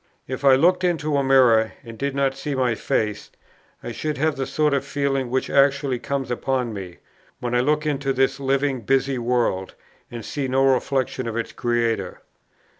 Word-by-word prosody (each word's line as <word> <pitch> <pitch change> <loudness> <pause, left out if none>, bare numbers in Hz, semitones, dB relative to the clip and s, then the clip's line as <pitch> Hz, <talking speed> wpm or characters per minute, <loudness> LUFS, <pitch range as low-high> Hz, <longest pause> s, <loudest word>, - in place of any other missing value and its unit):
If 130 +1 -5
I 135 -1 +7
looked 180 +6 +3
into 155 -4 0
a 140 - +1
mirror, 125 -5 +4
and 115 -2 -10
did 140 +3 -3
not 135 -1 +1
see 140 +1 -4
my 125 -3 +1
face, 105 -1 -2 0.5
I - - -5
should 155 -1 -3
have 155 +2 +1
the 135 -1 -3
sort 150 -1 +1
of 140 - +1
feeling 135 -2 -1
which 130 +1 -1
actually 140 -2 +2
comes 135 -1 -3
upon 125 -1 -1
me, 95 -4 -8 0.4
when 120 0 -3
I 125 - +3
look 150 +4 +1
into 145 -2 -1
this 135 +1 +1
living 135 -1 0
busy 135 +2 +1
world, 115 -6 -1 0.3
and 120 -2 -7
see 140 -2 -3
no 135 +1 +2
reflexion 130 -1 0
of 115 0 -3
its 115 - -3
Creator. 115 -6 -1
135 Hz, 185 wpm, -23 LUFS, 120-140 Hz, 0.5 s, I